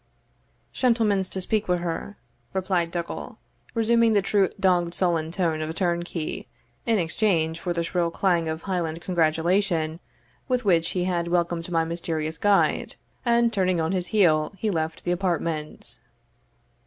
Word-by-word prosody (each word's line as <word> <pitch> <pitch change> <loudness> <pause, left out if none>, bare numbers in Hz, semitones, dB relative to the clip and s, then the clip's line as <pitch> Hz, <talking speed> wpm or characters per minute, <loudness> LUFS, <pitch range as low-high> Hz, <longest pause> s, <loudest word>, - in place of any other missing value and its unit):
"Shentlemans 220 -7 +2
to 190 - -4
speak 215 +3 0
wi' 180 - +3
her," 175 +4 -4 0.4
replied 185 -3 0
Dougal, 170 0 -5 0.4
resuming 230 0 +4
the 200 -2 +3
true 195 -1 +2
dogged 175 -3 +2
sullen 170 -4 +1
tone 165 -3 0
of 155 - -3
a 160 - -5
turnkey, 175 -2 -2 0.4
in 225 -1 +3
exchange 165 -2 +1
for 180 - -3
the 170 -1 0
shrill 170 0 0
clang 170 -2 +1
of 160 +1 -4
Highland 170 -4 -2
congratulation 170 -1 +1 0.5
with 250 -3 0
which 170 -4 +3
he 180 - +1
had 175 -2 -1
welcomed 170 -1 0
my 165 -2 +2
mysterious 160 -1 -3
guide; 205 -1 +2 0.3
and, 235 0 +3
turning 185 -3 +1
on 160 +1 0
his 180 -2 -1
heel, 165 -6 +3
he 215 +3 -1
left 160 -2 -2
the 175 - -1
apartment. 170 -4 -2
175 Hz, 150 wpm, -25 LUFS, 165-195 Hz, 0.5 s, resuming